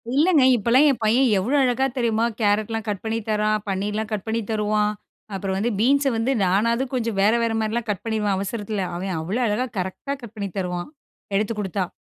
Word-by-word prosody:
இல்லைங்க, 310 Hz, -1 st, +4 dB
இப்போலாம் 240 Hz, +6 st, +4 dB
என் 270 Hz, -, 0 dB
பையன் 250 Hz, +5 st, +4 dB
எவ்வளோ 235 Hz, +10 st, 0 dB
அழகா 255 Hz, +1 st, +2 dB
தெரியுமா, 230 Hz, -2 st, +1 dB, 0.2 s
கேரட்லாம் 215 Hz, +1 st, +1 dB
கட் 200 Hz, -2 st, -3 dB
பண்ணி 225 Hz, +1 st, -1 dB
தரான். 215 Hz, 0 st, +1 dB
பன்னீர்லாம் 210 Hz, +3 st, -2 dB
கட் 210 Hz, -3 st, -3 dB
பண்ணி 225 Hz, +1 st, 0 dB
தருவான். 210 Hz, -1 st, +1 dB, 0.4 s
அப்புறம் 190 Hz, 0 st, -2 dB
வந்து 230 Hz, +5 st, 0 dB
பீன்ஸை 275 Hz, +3 st, +3 dB
வந்து 225 Hz, +4 st, +1 dB
நானாவது 230 Hz, +7 st, +2 dB
கொஞ்சம் 230 Hz, -5 st, -1 dB
வேற, 210 Hz, +3 st, +4 dB
வேற 230 Hz, -1 st, 0 dB
மாரிலாம் 220 Hz, +1 st, -2 dB
கட் 200 Hz, -3 st, -2 dB
பண்ணிருவேன் 215 Hz, -3 st, 0 dB
அவசரத்தில. 205 Hz, +1 st, -3 dB
அவன் 185 Hz, +1 st, -3 dB
அவ்வள 185 Hz, +9 st, -2 dB
அழகா 210 Hz, +4 st, 0 dB
கரெக்ட்டா 190 Hz, +9 st, -4 dB
கட் 230 Hz, -1 st, -10 dB
பண்ணி 200 Hz, -1 st, -3 dB
தருவான், 180 Hz, +1 st, -3 dB, 0.5 s
எடுத்துக் 210 Hz, +1 st, -1 dB
குடுத்தா. 190 Hz, -2 st, -2 dB
215 Hz, 180 wpm, -23 LUFS, 200-235 Hz, 0.5 s, இல்லைங்க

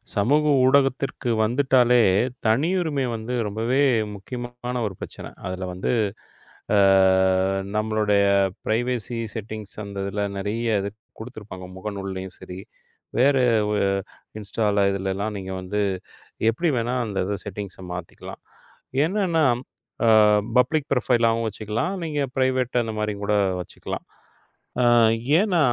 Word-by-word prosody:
சமூக 140 Hz, +9 st, +3 dB, 0.2 s
ஊடகத்திற்கு 135 Hz, -1 st, +2 dB
வந்துட்டாலே 125 Hz, 0 st, +4 dB, 0.4 s
தனியுரிமை 150 Hz, +4 st, +1 dB
வந்து 115 Hz, +2 st, -4 dB
ரொம்பவே 115 Hz, +6 st, -1 dB, 0.4 s
முக்கியமான 120 Hz, +4 st, -6 dB
ஒரு 95 Hz, -, -6 dB
பிரச்சன. -, -, -8 dB
அதுல 95 Hz, 0 st, -4 dB
வந்து 90 Hz, +1 st, -2 dB, 0.8 s
ஆ -, -, +5 dB, 1.0 s
நம்மளுடைய 105 Hz, -2 st, +2 dB, 0.4 s
ப்ரைவசி 120 Hz, +1 st, -1 dB, 0.2 s
செட்டிங்ஸ் 110 Hz, -1 st, -6 dB
அந்த 100 Hz, -1 st, -8 dB
இதுல 100 Hz, +1 st, -2 dB
நிறைய 110 Hz, +4 st, -2 dB, 0.5 s
கொடுத்திருப்பாங்க 110 Hz, -6 st, -9 dB
முகநூலையும் 95 Hz, -1 st, -6 dB
சரி, 90 Hz, +1 st, -9 dB, 0.6 s
வேற 140 Hz, +3 st, +5 dB, 1.1 s
Instaல 105 Hz, 0 st, +1 dB
இதுலெல்லாம் 100 Hz, +2 st, -2 dB
நீங்க 95 Hz, 0 st, -6 dB
வந்து 105 Hz, +3 st, -2 dB, 0.7 s
எப்படி 160 Hz, +7 st, 0 dB
வேணா 120 Hz, +2 st, -1 dB
அந்த 100 Hz, -2 st, -3 dB
இத 100 Hz, -1 st, -2 dB
செட்டிங்ஸ் 100 Hz, -1 st, -6 dB
மாத்திக்கலாம். 90 Hz, -2 st, -8 dB, 0.6 s
ஏன்னா 175 Hz, -5 st, +1 dB, 0.6 s
ஆ -, -, +5 dB, 0.5 s
பப்ளிக் 155 Hz, +2 st, +1 dB
ப்ரோஃபைலாவும் 115 Hz, -3 st, +2 dB
வச்சுக்கலாம். 110 Hz, -, -3 dB
நீங்க 150 Hz, -2 st, -2 dB, 0.2 s
பிரைவேட் 130 Hz, -2 st, +1 dB
அந்த 110 Hz, -1 st, -4 dB
மாரி 105 Hz, 0 st, -1 dB
கூட 105 Hz, -, +1 dB, 0.3 s
வச்சுக்கலாம். -, -, -7 dB, 0.8 s
ஆ -, -, +3 dB, 0.6 s
ஏன்னா 195 Hz, -5 st, +2 dB
115 Hz, 105 wpm, -24 LUFS, 100-130 Hz, 1.1 s, ஆ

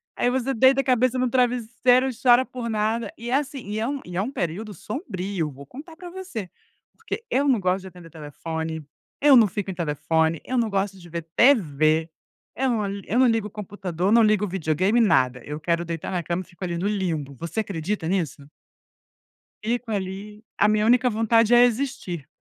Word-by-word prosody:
aí 245 Hz, -, +1 dB
você 260 Hz, +1 st, 0 dB
deita 265 Hz, +3 st, +5 dB
a -, -, -9 dB
cabeça 255 Hz, 0 st, +2 dB
no 250 Hz, 0 st, +1 dB
travesseiro 250 Hz, +1 st, +2 dB
e -, -, -2 dB
chora 250 Hz, 0 st, +5 dB
por 245 Hz, -3 st, -6 dB
nada. 220 Hz, +3 st, -1 dB
E, 235 Hz, +1 st, -6 dB
assim, 280 Hz, +1 st, 0 dB
e 210 Hz, +1 st, -2 dB
é 225 Hz, -, -1 dB
um 280 Hz, +1 st, -2 dB
e 175 Hz, -, -8 dB
é 190 Hz, -, +2 dB
um 235 Hz, -, -3 dB
período 205 Hz, -, -4 dB
sombrio, 190 Hz, -, -4 dB
vou 140 Hz, +1 st, -12 dB
contar 305 Hz, -, -12 dB
pra 355 Hz, 0 st, -9 dB
você, 345 Hz, -, -6 dB, 0.5 s
porque -, -, -5 dB
eu 280 Hz, +3 st, +1 dB
não 255 Hz, -5 st, +3 dB
gosto 185 Hz, 0 st, 0 dB
de 190 Hz, -, -10 dB
atender 180 Hz, -2 st, -13 dB
telefone, 160 Hz, +1 st, -5 dB, 0.4 s
eu 285 Hz, -1 st, +7 dB
não 230 Hz, -4 st, +7 dB
fico 200 Hz, +1 st, -4 dB
em -, -, -5 dB
telefone, 160 Hz, -1 st, 0 dB
eu 255 Hz, -, -2 dB
não 230 Hz, -2 st, +1 dB
gosto 195 Hz, -1 st, -1 dB
de 175 Hz, -2 st, -14 dB
ver 170 Hz, 0 st, -4 dB
TV, 160 Hz, -, +3 dB, 0.5 s
eu 265 Hz, 0 st, 0 dB
não 220 Hz, -4 st, 0 dB, 0.2 s
eu 240 Hz, -, 0 dB
não 260 Hz, -, +6 dB
ligo 225 Hz, -3 st, +1 dB
o -, -, -11 dB
computador, 195 Hz, -3 st, -3 dB
não 230 Hz, 0 st, +6 dB
ligo 210 Hz, -1 st, +3 dB
o -, -, -4 dB
videogame, 185 Hz, +4 st, +1 dB
nada. 130 Hz, -, +3 dB
Eu 150 Hz, +1 st, -5 dB
quero 170 Hz, +1 st, 0 dB
deitar 165 Hz, -1 st, -5 dB
na 180 Hz, -2 st, -2 dB
cama 170 Hz, +3 st, -2 dB
e -, -, -23 dB
fico 175 Hz, +1 st, -11 dB
ali 175 Hz, -2 st, -2 dB
no 185 Hz, +4 st, -1 dB
limbo. 165 Hz, -9 st, -2 dB
Você 170 Hz, +5 st, -4 dB
acredita 190 Hz, -2 st, -3 dB
nisso? 160 Hz, -6 st, -2 dB, 1.1 s
Fico 235 Hz, +1 st, -2 dB
ali. 205 Hz, +2 st, -5 dB
A 205 Hz, -, +4 dB
minha 215 Hz, 0 st, +2 dB
única 250 Hz, +2 st, +4 dB
vontade 225 Hz, +1 st, +3 dB
é 240 Hz, -, +8 dB
existir. 240 Hz, -, -1 dB
210 Hz, 205 wpm, -24 LUFS, 170-245 Hz, 1.1 s, é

